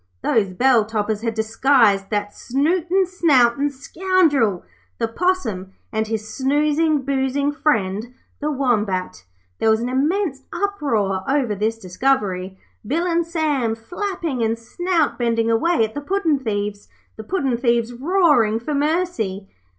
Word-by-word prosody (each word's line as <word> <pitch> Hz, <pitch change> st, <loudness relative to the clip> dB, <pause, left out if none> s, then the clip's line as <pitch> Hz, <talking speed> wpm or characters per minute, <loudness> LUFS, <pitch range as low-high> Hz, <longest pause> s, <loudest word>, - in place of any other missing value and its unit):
Those 215 Hz, -3 st, +2 dB
bell 240 Hz, +4 st, +3 dB
toppers 215 Hz, 0 st, -2 dB
had 225 Hz, -1 st, -2 dB
disguised 220 Hz, -3 st, +3 dB
that 205 Hz, -1 st, -2 dB
snooting, 345 Hz, +8 st, +1 dB
snouting 290 Hz, -7 st, +3 dB
scoundrel, 285 Hz, -, +1 dB, 0.3 s
the 230 Hz, -, 0 dB
Possum, 225 Hz, -, -1 dB, 0.2 s
and 220 Hz, 0 st, 0 dB
his 220 Hz, 0 st, -4 dB
snoozing, 295 Hz, +2 st, +1 dB
boozing 275 Hz, +1 st, 0 dB
friend 225 Hz, -7 st, 0 dB, 0.3 s
the 300 Hz, -, -1 dB
Wombat! 210 Hz, -, -1 dB, 0.4 s
There 225 Hz, -, +2 dB
was 220 Hz, 0 st, +3 dB
an 240 Hz, +2 st, -2 dB
immense 290 Hz, +2 st, 0 dB
uproar 260 Hz, -, -1 dB
over 270 Hz, -6 st, +1 dB
this 215 Hz, +3 st, -1 dB
discovery, 190 Hz, -2 st, -1 dB, 0.3 s
Bill 310 Hz, +11 st, -1 dB
and 340 Hz, -1 st, +1 dB
Sam 295 Hz, -9 st, 0 dB
flapping 335 Hz, -, -4 dB
and 225 Hz, 0 st, 0 dB
snout 330 Hz, +7 st, -1 dB
bending 230 Hz, -1 st, +1 dB
away 230 Hz, +2 st, +2 dB
at 220 Hz, -, -8 dB
the 290 Hz, -, -4 dB
puddin' 330 Hz, -3 st, 0 dB
thieves, 205 Hz, -4 st, -3 dB, 0.3 s
the 220 Hz, -, -8 dB
puddin' 270 Hz, -, -1 dB
thieves 235 Hz, -1 st, +1 dB
roaring 270 Hz, -, +2 dB
for 265 Hz, +6 st, -4 dB
mercy. 285 Hz, -, -1 dB
250 Hz, 135 wpm, -21 LUFS, 220-305 Hz, 0.4 s, bell